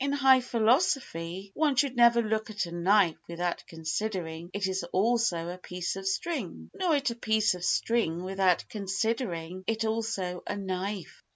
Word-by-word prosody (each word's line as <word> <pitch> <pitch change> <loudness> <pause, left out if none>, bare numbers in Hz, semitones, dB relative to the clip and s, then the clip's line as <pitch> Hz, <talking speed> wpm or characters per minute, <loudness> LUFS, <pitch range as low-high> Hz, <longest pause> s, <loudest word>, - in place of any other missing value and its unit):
In 280 0 0
high 265 -2 +5
philosophy 220 - 0
one 300 -3 +2
should 265 0 +2
never 235 0 +6
look 220 0 -1
at 205 -3 -2
a 170 - -8
knife 175 0 +3
without 175 +1 -3
considering 165 0 -4
it 200 0 -1 0.2
also 205 -5 +1
as - - -4
a - - -9
piece 180 0 -4
of 195 0 -5
string, 265 - -3
nor 365 -5 +1
at 275 -3 +1
a - - -5
piece 220 -3 +2
of 180 -1 -8
string 180 -6 +1
without 190 -1 +2
considering 195 -4 -2
it 225 0 0
also 220 -5 -2
as - - -2
a - - -4
knife. 190 0 -4
200 Hz, 170 wpm, -29 LUFS, 180-235 Hz, 0.2 s, never